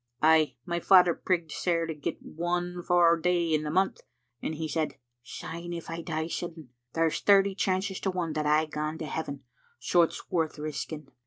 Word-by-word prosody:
' 120 - -46
Ay, 155 -1 +5
my 175 -1 -1
father 180 -1 +6
prigged 170 -4 -1
sair 170 0 0
to 165 - -3
get 150 -2 -4
one 175 +2 -2
fou 175 -1 +4
day 175 -1 +2
in 155 - +2
the 150 - -4
month, 190 +5 +1 0.4
and 160 - -3
he 160 +1 -3
said, 155 -1 -1 0.3
*Syne 170 +7 -7
if 170 -1 -6
I 165 0 -4
die 160 -1 -2
sudden, 165 -4 -6 0.2
there's 165 -1 +1
thirty 200 -1 +5
chances 190 0 -1
to 195 - -1
one 175 -4 -2
that 150 -1 -1
I 155 +1 +4
gang 155 +1 -3
to 160 - -5
heaven, 140 -2 -4 0.3
so 170 +8 +3
it's 165 - -2
worth 160 -3 0
risking.' 150 -1 -5
165 Hz, 190 wpm, -28 LUFS, 155-175 Hz, 0.4 s, father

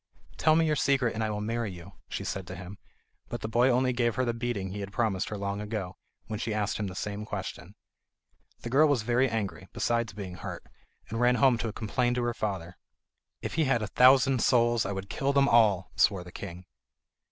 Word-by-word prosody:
"Tell 155 - +4
me 165 0 +4
your 155 -1 +2
secret 135 -4 +2
and 110 - -2
I 110 - 0
will 105 -1 -3
marry 115 0 -2
you," 85 -2 -11 0.2
she - - -4
said 95 -2 -4
to - - -7
him; 90 +2 -9 0.5
but 120 - -5
the 110 - -3
boy 120 +3 +3
only 125 0 +2
gave 120 -2 +1
her 130 - +1
the 120 - 0
beating 115 -5 -3
he 105 - -5
had 100 -1 -5
promised 105 -5 0
her 105 - -4
long 100 +1 -3
ago, 105 -3 -4 0.3
when 105 -1 -5
she 110 -2 -2
asked 105 -1 -1
him 105 - -2
the 90 - -7
same 105 +1 -4
question. 95 -2 -6 0.9
The 120 - -6
girl 150 +4 +6
was 140 -7 +1
very 125 +3 +2
angry, 110 -4 -3
besides 115 -2 0
being 95 -3 -7
hurt, 90 -2 -7 0.5
and 115 +2 -3
ran 125 0 +4
home 130 -3 +4
to 115 -2 -2
complain 120 +3 -1
to 125 - 0
her 120 0 0
father. 95 -6 -4 0.6
"If - - -3
he 160 -1 +2
had 120 -4 +1
a - - -2
thousand 130 0 +6
souls, 120 -3 +3
I - - -2
would 95 0 -5
kill 135 +6 -1
them 140 0 +4
all," 105 -7 +4
swore 95 -4 +3
the 90 - -12
king. 90 -1 -8
110 Hz, 220 wpm, -28 LUFS, 100-120 Hz, 0.9 s, girl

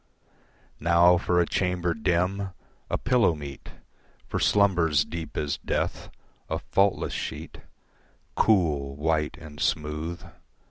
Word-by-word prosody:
Now 85 +2 +5
for 90 0 +1
a 85 - +4
chamber 90 -1 0
dim, 95 -1 0 0.4
a - - 0
pillow 115 -10 +2
meet 70 -2 -9 0.6
For - - -3
slumbers 85 -7 +3
deep 85 -1 -6
as 75 -2 -1
death, - - -2 0.4
a 80 - -1
faultless 100 +4 +1
sheet, - - -5 0.8
Cool, 75 -10 +2
white 75 0 0
and 75 -2 -11
smooth. 75 +2 -2
85 Hz, 110 wpm, -26 LUFS, 75-90 Hz, 0.8 s, Now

